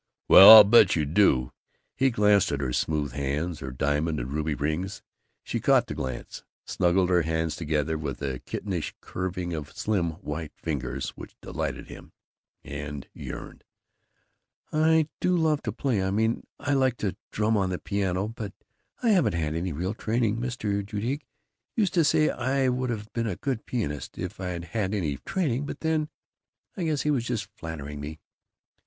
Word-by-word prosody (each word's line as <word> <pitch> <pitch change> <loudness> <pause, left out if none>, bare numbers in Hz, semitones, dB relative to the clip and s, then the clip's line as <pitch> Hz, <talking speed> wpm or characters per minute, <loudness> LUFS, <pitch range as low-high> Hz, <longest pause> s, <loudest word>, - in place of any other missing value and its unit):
"Well, 95 - +11
I'll 110 -1 +13
bet 105 -2 +6
you 80 -3 +1
do!" 70 -6 +3 0.4
He 135 0 +3
glanced 105 -4 +3
at 70 - -1
her 65 -3 -2
smooth 75 -2 0
hands, 75 +5 -2
her 65 - -5
diamond 75 +5 0
and - - -5
ruby 75 0 -1
rings. 80 +7 -3 0.4
She - - -3
caught - - +4
the - - -5
glance, 65 -2 -6 0.2
snuggled 90 +1 +2
her 90 -1 +4
hands 80 0 -1
together 80 -1 -1
with 70 -4 -4
a 65 -3 -2
kittenish 95 -6 -4
curving 90 -1 -4
of 75 -3 -5
slim 90 -6 0
white 80 -2 -6
fingers 75 -5 -3
which - - -11
delighted - - -4
him, - - -12 0.5
and 75 -1 -6
yearned: - - -8 1.1
"I 160 0 +4
do 180 0 +2
love 155 -3 +2
to 110 - -3
play 120 -2 -1
I 95 - 0
mean 110 +3 0
I 145 - -1
like 130 -3 +2
to 95 -3 -2
drum 110 +1 +1
on 95 -3 +1
the 90 - -2
piano, 95 0 -1
but 110 -3 -6 0.5
I 235 - +3
haven't 190 - +3
had 80 -2 -1
any 85 +3 -2
real 90 +7 -2
training. 115 0 0
Mr. 115 -4 -2
Judique 115 +8 -3 0.5
used 205 -5 +1
to 170 -4 +4
say 155 +1 +3
I 130 +1 0
would've 120 -4 -3
been 115 -1 -1
a 95 - -2
good 130 0 -3
pianist 90 - -3
if 90 +2 -5
I'd 90 -2 -4
had 100 +3 -2
any 75 -8 -1
training, 145 - -2
but - - -7
then, 160 -1 0 0.7
I 180 - -2
guess 155 -3 0
he 150 - +2
was 130 -5 +1
just 120 -3 -3
flattering 75 -3 -7
me." 75 +2 -7
95 Hz, 175 wpm, -27 LUFS, 80-120 Hz, 1.1 s, I'll